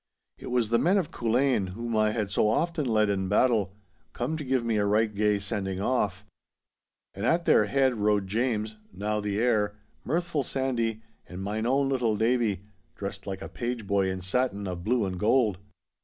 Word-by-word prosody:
It - - -9
was 120 -3 +1
the 115 0 +3
men 185 +5 +3
of 180 -6 -1
Culzean, 120 -5 +1
whom 115 +2 -4
I 110 0 +3
had 105 -2 -2
so 105 - +2
often 160 +7 0
led 110 -3 +2
in 95 -2 -1
battle, 105 -3 +2 0.4
come 125 +7 -2
to 155 - -4
give 130 -3 0
me 115 -2 +1
a 105 - +2
right 105 +1 +2
gay 105 0 +2
sending 100 -2 -3
off. 105 -3 0 0.9
And 100 - -6
at 165 +7 +2
their 105 - +5
head 130 +4 +2
rode 105 -2 +1
James 110 0 -1
(now 105 +3 -2
the 105 -1 -2
heir), 110 -4 +1 0.3
mirthful 165 +1 -1
Sandy, 120 -4 -1 0.3
and 90 +1 -6
mine 110 +3 -2
own 135 +2 +2
little 120 -5 +1
Davie, 110 -4 +1 0.3
dressed 100 0 -6
like 95 -1 -4
a - - -5
page 120 -2 -4
boy 100 -1 +1
in 95 0 -4
satin 100 +1 0
of 90 -1 -5
blue 120 0 +1
and 90 -2 -4
gold. 110 -3 +2
110 Hz, 185 wpm, -27 LUFS, 100-125 Hz, 0.9 s, their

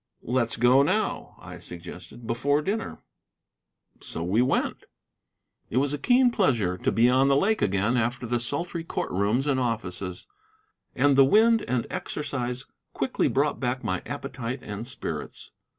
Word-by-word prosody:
"Let's 120 -1 0
go 125 +3 +5
now," 140 - -1
I - - -10
suggested, 90 +5 -10
"before 140 +6 +1
dinner." 215 +5 -3 1.0
So 80 - -5
we 95 +7 +2
went. 130 +3 0 0.8
It 120 - -2
was 140 +2 +2
a 145 - -3
keen 245 - +4
pleasure 120 - +1
to - - -1
be 115 +2 +4
on 130 +2 +4
the 140 - +4
lake 215 +9 +2
again 105 +5 +1
after 120 +1 -1
the 120 +1 0
sultry 165 +7 -2
court - - -3
rooms 105 +8 +1
and 140 -3 +1
offices, 100 -7 -3 0.7
and 140 +2 +4
the 135 - +7
wind 220 +10 +5
and 125 -2 0
exercise 130 -3 -3 0.3
quickly - - 0
brought 145 +2 +1
back 130 0 -2
my 95 -4 -1
appetite 130 -1 -5
and 105 +3 -6
spirits. 130 - -6
125 Hz, 150 wpm, -26 LUFS, 115-145 Hz, 1.0 s, the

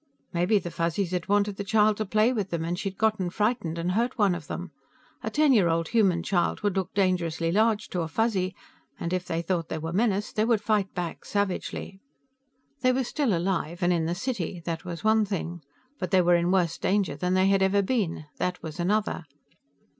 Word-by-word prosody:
Maybe 180 +5 +3
the 175 -3 -4
Fuzzies 170 +3 -1
had 180 -2 -2
wanted 205 0 +2
the 200 - -3
child 210 +1 +3
to 215 - -2
play 215 +5 +3
with 205 -5 -2
them, 165 -2 -2
and 175 +2 -2
she'd 195 -2 -4
gotten 215 -5 +1
frightened 205 -4 -1
and 170 +2 -1
hurt 235 +7 0
one 205 -4 +3
of 170 -4 -6
them. 180 -1 -5 0.5
A 220 - -3
ten 295 +4 +4
year 195 -8 +4
old 165 0 0
human 190 -7 +3
child 175 -2 0
would 205 -2 0
look 190 -1 -1
dangerously 170 -4 +1
large 215 +2 +2
to 180 - -2
a 165 - -2
Fuzzy, 190 +1 0 0.4
and 170 - -3
if 180 -1 -1
they 165 +1 -2
thought 170 -2 -1
they - - -2
were 160 +1 -4
menaced 210 0 0
they 215 - +4
would 225 -1 +3
fight 210 -2 0
back 175 -2 -4
savagely. 195 -1 -3 0.8
They 255 0 +3
were 260 +1 +1
still 245 - 0
alive 175 -1 -2
and 175 +1 +4
in 165 -2 0
the 170 - -1
city. 195 -5 -3
That 165 -1 -3
was 175 0 -6
one 220 0 +4
thing. 175 -4 -4 0.4
But 185 - -2
they 185 -2 +4
were 175 0 +4
in 170 0 +3
worse 180 -3 +1
danger 195 -6 +1
than 180 +5 0
they 185 0 +4
had 195 0 +3
ever 195 +1 +3
been; 190 -9 -1
that 180 0 -2
was 160 +1 -7
another. 200 -1 0
190 Hz, 215 wpm, -27 LUFS, 175-210 Hz, 0.8 s, ten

